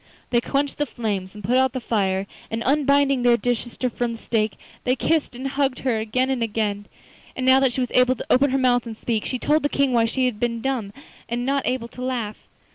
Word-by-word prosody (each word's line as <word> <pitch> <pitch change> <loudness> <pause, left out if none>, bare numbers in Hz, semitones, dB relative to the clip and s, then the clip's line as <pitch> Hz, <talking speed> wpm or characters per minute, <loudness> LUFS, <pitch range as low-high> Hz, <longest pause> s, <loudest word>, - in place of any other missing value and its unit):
They 240 -1 +3
quenched 280 +3 -1
the 295 - +1
flames 205 -5 -3
and 210 - -10
put 240 +7 +2
out 260 -1 +3
the 255 - -2
fire, 195 -5 0 0.2
and, 225 +1 -3
unbinding 280 -1 +3
their 240 -1 +5
dear 245 +3 +1
sister 240 +2 -4
from 240 -1 -2
the - - -7
stake, 220 -2 0 0.3
they 255 - +2
kissed 305 0 0
and 260 +2 -4
hugged 270 -2 0
her 245 -4 0
again 255 +4 0
and 260 -3 -1
again. 210 -2 -1 0.5
And 255 - -2
now 260 +1 +6
that 270 -2 +3
she 260 - -1
was 250 - -2
able 250 0 +4
to - - -7
open 280 +3 +5
her 265 - +1
mouth 245 -2 +2
and 220 -1 -7
speak, 225 -2 -2
she 255 - -2
told 300 +5 +2
the 290 - 0
King 280 -3 +1
why 230 -1 +4
she 255 +3 0
had 240 -4 -1
been 235 0 -1
dumb 240 -5 -2 0.4
and 240 +1 -2
not 275 +1 0
able 250 -2 -1
to 250 - -10
laugh. 240 -5 -4
245 Hz, 240 wpm, -23 LUFS, 225-265 Hz, 0.5 s, now